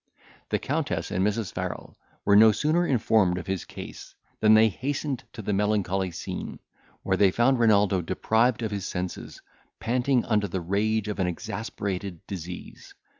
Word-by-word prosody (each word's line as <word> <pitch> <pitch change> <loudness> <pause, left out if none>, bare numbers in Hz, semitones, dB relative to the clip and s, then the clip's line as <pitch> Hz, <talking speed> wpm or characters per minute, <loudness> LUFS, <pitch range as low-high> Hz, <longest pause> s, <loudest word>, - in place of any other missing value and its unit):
The - - +1
Countess - - -2
and 95 - 0
Mrs. 105 0 -1
Farrel - - -5 0.3
were 100 - +5
no 110 +1 +8
sooner 155 +9 +1
informed 110 -7 +2
of 90 - -5
his 95 -3 -3
case - - -10 0.2
than 110 0 +6
they 110 +1 +6
hastened 135 - -3
to 110 - -8
the 105 - -1
melancholy 95 -2 0
scene, 85 - -6 0.5
where - - +1
they 100 - +5
found 120 +6 +2
Renaldo 105 -4 +4
deprived 110 +7 +1
of 110 - -2
his 100 -2 -3
senses, 90 0 -5 0.4
panting 125 +2 +1
under 105 -3 +1
the 95 +1 -3
rage 105 +4 0
of 105 -1 -4
an 95 - +1
exasperated 100 -2 -4
disease. 90 -2 -8
105 Hz, 160 wpm, -26 LUFS, 95-115 Hz, 0.5 s, no